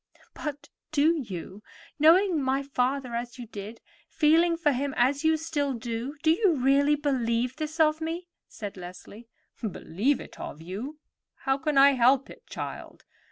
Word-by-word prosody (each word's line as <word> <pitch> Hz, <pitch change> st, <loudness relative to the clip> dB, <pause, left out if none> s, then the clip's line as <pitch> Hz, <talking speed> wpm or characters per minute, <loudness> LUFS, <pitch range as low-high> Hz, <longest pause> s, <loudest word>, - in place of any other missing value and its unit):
"But 290 Hz, -1 st, -6 dB, 0.2 s
do 310 Hz, +2 st, +3 dB
you, 190 Hz, -3 st, -7 dB, 0.4 s
knowing 335 Hz, +2 st, +5 dB
my 270 Hz, +1 st, 0 dB
father 265 Hz, -1 st, -1 dB
as 240 Hz, +1 st, -4 dB
you 245 Hz, -, -7 dB
did, 215 Hz, +1 st, -9 dB, 0.3 s
feeling 330 Hz, +2 st, +3 dB
for 310 Hz, -3 st, +2 dB
him 275 Hz, +1 st, -2 dB
as 275 Hz, +4 st, +2 dB
you 320 Hz, 0 st, +3 dB
still 295 Hz, -3 st, -1 dB
do—do 245 Hz, +7 st, -2 dB
you 355 Hz, 0 st, +3 dB
really 280 Hz, +2 st, +3 dB
believe 250 Hz, -3 st, 0 dB
this 310 Hz, +1 st, -5 dB
of 310 Hz, 0 st, +3 dB
me?" 335 Hz, +3 st, -4 dB, 0.2 s
said 205 Hz, -3 st, -8 dB
Leslie. 185 Hz, +5 st, -10 dB, 0.3 s
"Believe 220 Hz, -, -1 dB
it -, -, -11 dB
of 150 Hz, -, -7 dB
you? 205 Hz, -, -6 dB, 0.5 s
How 270 Hz, 0 st, +2 dB
can 295 Hz, +1 st, -1 dB
I 275 Hz, +1 st, +8 dB
help 260 Hz, +1 st, +3 dB
it, 485 Hz, -, -15 dB
child? -, -, -7 dB
275 Hz, 155 wpm, -27 LUFS, 235-310 Hz, 0.5 s, I